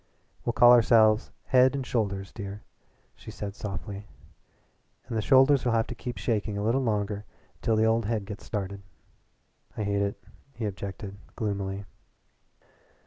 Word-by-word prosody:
"We'll 120 - -1
call 120 +1 +7
ourselves 110 -2 +5
Head 130 +1 +4
and 135 -2 -3
Shoulders, 100 -5 -2
dear," 100 -1 -7 0.5
she - - -12
said 100 -1 -6
softly, 100 0 -6 1.0
"and 115 - -4
the 110 - +1
shoulders'll 130 0 +5
have 115 0 +2
to 120 - -6
keep 120 0 -6
shaking 105 -3 -1
a 100 - -2
little 120 +5 +2
longer 105 -3 -1 0.3
until 115 - +1
the 110 0 +3
old 115 0 +2
head 110 -3 -1
gets 105 0 -8
started." 100 -1 -4 1.0
"I 110 - -1
hate 100 0 0
it," 100 0 -1 0.4
he 115 -1 -3
objected 100 0 -6 0.2
gloomily. 100 -2 -3
105 Hz, 145 wpm, -28 LUFS, 100-115 Hz, 1.0 s, call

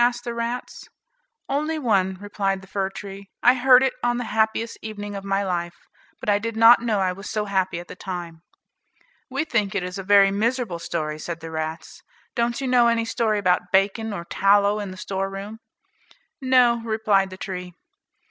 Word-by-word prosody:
asked 240 0 +1
the 240 -1 -4
rats. 235 +1 -5 0.6
"Only 305 +3 -1
one," 195 -9 +1
replied 195 -1 -2
the - - -14
fir 190 0 -2
tree; 195 0 -9
"I 245 - +7
heard 255 0 +6
it 265 - +1
on 240 0 +1
the 245 - -2
happiest 220 +1 0
evening 205 -1 -6
of 195 - -6
my 195 0 0
life; 175 -2 -2 0.4
but - - -9
I 205 -1 +3
did 225 +1 -4
not 230 +1 +8
know 225 -4 0
I 185 -1 +1
was 195 +3 -8
so 215 -1 -1
happy 190 -3 -1
at 175 - -10
the - - -9
time." 175 -3 -7 0.9
"We 275 +4 -2
think 210 -7 -1
it 195 - 0
is 180 +2 -5
a - - -5
very 200 0 +5
miserable 220 -3 -1
story," 155 -2 -3
said 170 +1 -5
the 165 0 -8
rats. 160 +1 -5 0.3
"Don't 235 0 0
you 270 - -2
know 245 -2 +4
any 230 -1 +1
story 225 -2 0
about 180 -2 +1
bacon, 205 +3 +1
or 170 -4 -5
tallow 200 +3 +3
in 205 -2 -4
the 185 - -9
storeroom." 195 +3 -5 0.8
"No," 250 -3 +4
replied 215 -3 +1
the 185 - -10
tree. 180 -2 -6
205 Hz, 190 wpm, -23 LUFS, 190-235 Hz, 0.9 s, not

